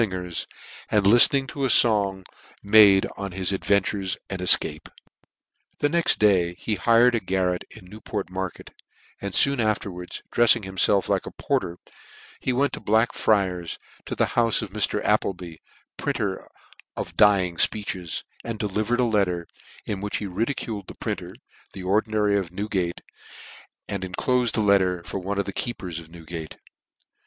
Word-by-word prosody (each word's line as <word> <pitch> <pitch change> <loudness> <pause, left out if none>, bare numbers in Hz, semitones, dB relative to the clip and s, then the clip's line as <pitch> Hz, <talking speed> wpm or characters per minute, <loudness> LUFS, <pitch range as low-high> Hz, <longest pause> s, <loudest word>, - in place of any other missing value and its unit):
405 115 - +1
fingers, 90 -2 -4 0.4
and 105 -2 +2
liftening 120 +6 +7
to 140 - -5
a 135 - +1
fong 100 -6 +4 0.4
made 100 -2 +6
on 100 -2 -5
hi$ 95 0 -5
ad 95 - -4
ventures 100 -1 0
and 95 -1 -4
efcape. 90 - +4
On - - -34 0.8
the 145 - +1
next 170 +1 +2
day 90 -5 +2
he 110 +4 -3
hired 115 +4 +4
a 115 - +1
garret 90 -2 -1
jn - - -11
Newport 105 -1 -6
market, 95 -1 -6 0.5
and 100 -2 -5
foon 140 -1 +3
afterwards, 100 -5 -3
drefiing 120 -1 +4
himfclf 95 +1 +1
like - - -1
a - - -6
porter, 85 +1 -2 0.6
he 130 - -1
went 140 +3 +1
to - - -4
Black 110 +3 +1
friars, 95 -5 0 0.3
to - - -4
the - - +2
heufe 115 -2 +2
of - - -8
Mr. - - -1
Applebee, 85 -4 -1 0.4
printer - - -3 0.5
of - - -4
the - - -16
dying 95 -5 +4
fpeeches, 95 -5 -1 0.2
and 115 -1 -5
delivered 105 +3 -1
a - - +3
letter, 100 -7 0 0.4
in 100 -2 -4
which 105 0 -2
he 105 - -5
ridiculed 105 0 -4
the - - -10
printer, - - -4
and - - -17 0.4
the 95 - -8
Ordinary 105 +1 +1
of 90 -4 -6
Newgate, 95 -3 -3 0.9
and 100 -2 -4
en 90 -1 -7
clofed 125 -3 0
a - - +2
letter 95 -4 +2
for 95 - -5
one 100 +2 -4
of 100 - 0
the 100 - -6
keepers 90 -9 -4
of 80 -1 -13
Newgate. 80 -1 -9
100 Hz, 165 wpm, -24 LUFS, 90-110 Hz, 0.9 s, liftening